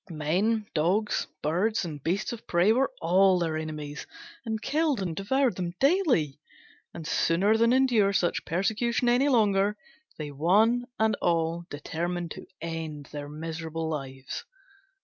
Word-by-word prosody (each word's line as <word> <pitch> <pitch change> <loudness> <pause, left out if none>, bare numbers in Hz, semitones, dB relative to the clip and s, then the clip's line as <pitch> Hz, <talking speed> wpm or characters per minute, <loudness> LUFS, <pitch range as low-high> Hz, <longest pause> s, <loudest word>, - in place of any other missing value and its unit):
Men, 185 +8 0
dogs, 185 +7 +1 0.2
birds 185 +8 +1
and 150 -4 -6
beasts 190 - -1
of 235 - -10
prey 180 +5 +4
were 260 +3 +2
all 185 +3 +4
their 165 -3 -1
enemies, 150 -2 -5 0.4
and 220 -2 -3
killed 300 0 0
and 175 -4 -3
devoured 245 +4 +1
them 175 -1 -3
daily: 270 - +2 0.5
and 165 - -8
sooner 180 +6 +2
than 230 +1 +4
endure 245 -6 +4
such 180 -3 0
persecution 220 +7 0
any 250 +4 +4
longer, 210 -4 +3 0.4
they 150 -2 -5
one 215 - +3
and 220 -1 +2
all 170 0 0
determined 170 +3 -4
to - - -8
end 160 -3 -5
their 145 -1 -6
miserable 160 +1 -4
lives. 135 -3 -5
180 Hz, 140 wpm, -27 LUFS, 160-220 Hz, 0.5 s, prey